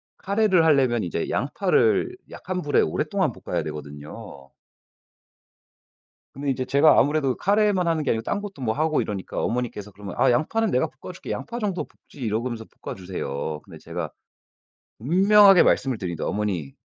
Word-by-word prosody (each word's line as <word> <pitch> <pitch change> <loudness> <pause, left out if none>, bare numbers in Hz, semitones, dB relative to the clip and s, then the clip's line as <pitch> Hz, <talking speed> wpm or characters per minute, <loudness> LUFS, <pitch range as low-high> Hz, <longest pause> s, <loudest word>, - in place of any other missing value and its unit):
카레를 200 -3 +2
하려면 130 -7 +3
이제 85 -2 -3
양파를 140 - +1
약한 185 0 -5
불에 145 -3 +2
오랫동안 80 - 0
볶아야 - - -3
되거든요. 75 -2 -9 1.9
근데 140 +1 -3
인제 130 -1 -1
제가 145 +4 +5
아무래도 145 -3 +2
카레만 200 -2 +2
하는 165 -2 +1
게 145 - +1
아니고 110 - 0
딴 205 - -2
것도 200 -9 -8
뭐 110 -3 0
하고 155 +2 +1
이러니까 100 -3 -4
어머니께서 115 -4 -3
그러면 100 0 -9
"아 - - +4
양파는 220 - +1
내가 125 - +2
볶아줄게. 170 +7 -9
양파 240 +1 -4
정도 200 -5 -2
볶지." - - -21
이러고서 115 0 -2 0.2
볶아 - - -5
주세요. 80 -5 -4
근데 - - -13
제가 85 -1 -5 0.9
분명하게 195 - +6
말씀을 130 -3 +2
드립니다. 85 -5 -4
"어머니. 95 -9 -2
130 Hz, 375 characters per minute, -24 LUFS, -, 1.9 s, 분명하게